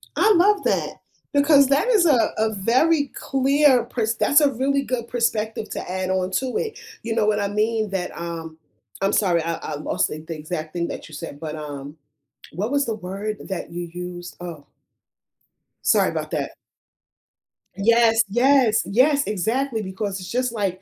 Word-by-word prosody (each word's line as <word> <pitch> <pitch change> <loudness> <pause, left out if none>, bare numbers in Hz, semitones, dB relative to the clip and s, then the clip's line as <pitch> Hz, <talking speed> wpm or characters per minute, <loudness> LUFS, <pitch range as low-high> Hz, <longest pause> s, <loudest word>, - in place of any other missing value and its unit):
I 435 - +4
love 400 +3 +4
that - - -1 0.3
because 285 -1 +5
that 280 - +2
is 430 -8 +4
a 270 -8 +4
a 220 0 +1
very 265 +10 +2
clear 270 -1 +3
pers 225 -2 -1
that's 285 +6 +4
a 290 -2 +4
really 275 +2 0
good 250 -3 -3
perspective 225 -2 -1
to - - -5
add 185 0 -2
on 185 0 0
to 255 +7 -1
it, 445 -1 -3 0.3
you 225 -1 -2
know 215 - +2
what 210 0 +2
I 200 - 0
mean, 215 +1 0
that, 185 -2 -3
um 165 -1 -6 0.4
I'm 195 - +1
sorry, 175 -5 +2
I 165 0 -2
I 155 - -6
lost 150 - -1
the 155 - -6
the 160 +1 -7
exact 155 0 -5
thing 170 -1 -1
that - - -7
you 155 - -10
said, 145 -1 -8
but, 155 -1 -5
um, 145 -1 -7 0.5
what 205 +9 -3
was 285 0 +2
the 225 - -2
word 200 +2 -5
that 190 -3 -5
you 175 0 -5
used? 175 0 -7
Oh 165 -5 -8 1.2
sorry - - +4
about - - -4
that. - - -2 1.2
Yes, 225 +3 +4
yes, 245 0 +4
yes, 280 +7 +3
exactly, 225 +4 -1
because 190 0 -4
it's 185 - -8
just 250 0 0
like 195 -5 -2
215 Hz, 175 wpm, -23 LUFS, 180-260 Hz, 1.2 s, because